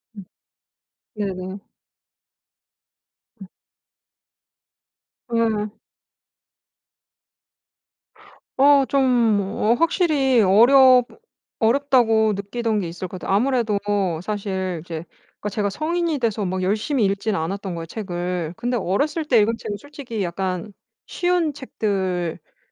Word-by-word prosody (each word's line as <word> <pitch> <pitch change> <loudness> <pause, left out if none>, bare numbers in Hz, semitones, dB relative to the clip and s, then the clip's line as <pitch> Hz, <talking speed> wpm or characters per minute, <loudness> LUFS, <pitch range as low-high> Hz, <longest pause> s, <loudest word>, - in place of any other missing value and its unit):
음. 200 - -9 0.9
네네. 190 -2 -4 1.8
음. 195 - -9 1.8
음. 220 -2 0 2.9
어 280 0 +6
좀 275 -1 +2 0.3
뭐 205 +3 0
확실히 295 - +2
어렵 250 +5 +6 0.5
어렵다고 225 -3 +3
느끼던 215 +2 -2
게 180 - -3
있을 180 +2 -6
것 185 +1 -8
같아요. 190 - -1
아무래도 235 -2 +1 0.5
사실 190 -3 -3
이제 165 -1 -6 0.3
그러니까 210 - -3
제가 205 0 -1
성인이 325 - -1
돼서 220 -4 -1
막 185 0 -2
열심히 215 +5 +1
읽지는 200 0 -1
않았던 190 +2 -4
거예요 165 -1 -5
책을. 175 -3 -4
근데 245 +2 -2
어렸을 285 - -1
때 250 -7 +4
읽은 215 +2 +3
책은 205 -2 -5
솔직히 250 -4 -6
약간 185 +2 -3 0.3
쉬운 350 -4 0
책들이었거든요. 190 - -3
210 Hz, 225 characters per minute, -22 LUFS, 190-260 Hz, 2.9 s, 어